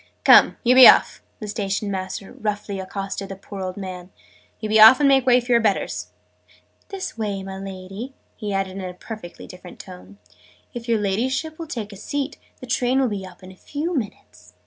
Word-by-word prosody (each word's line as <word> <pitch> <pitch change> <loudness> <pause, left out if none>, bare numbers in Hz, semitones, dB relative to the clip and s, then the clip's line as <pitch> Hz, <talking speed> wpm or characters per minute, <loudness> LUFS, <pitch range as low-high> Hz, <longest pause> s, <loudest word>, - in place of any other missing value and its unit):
"Come, - - +6
you 245 0 +4
be 255 -1 +10
off!" - - +5 0.2
the 215 - -6
Station 200 -1 -3
master 190 +1 -5
roughly 205 -2 -4
accosted 195 +1 -5
the 195 - -6
poor 195 +1 -9
old 185 0 -5
man. 185 -2 -7 0.5
"You 215 - -4
be 215 +1 +3
off, 220 +5 +9
and 290 - +4
make 270 -2 +3
way 250 0 +6
for 245 0 -5
your 235 -1 +5
betters! 210 -3 -1 0.8
This 385 - -6
way, 200 -3 -3
my 190 0 -7
Lady!" 195 +6 -8 0.2
he 210 -2 -5
added 195 -1 -2
in - - -5
a 180 - -10
perfectly 215 -3 -10
different 180 -1 -12
tone. 185 +1 -12 0.6
"If 240 -1 -7
your 230 - +3
Ladyship 260 - -2
will 330 - -6
take 220 -8 -6
a - - -11
seat, 285 +6 -4 0.2
the - - -7
train 250 +1 +1
will 260 -2 +2
be 195 -3 -5
up 185 +1 -16
in 185 - -11
a - - -15
few 305 - -4
minutes." 90 - -7
205 Hz, 200 wpm, -22 LUFS, 190-245 Hz, 0.8 s, be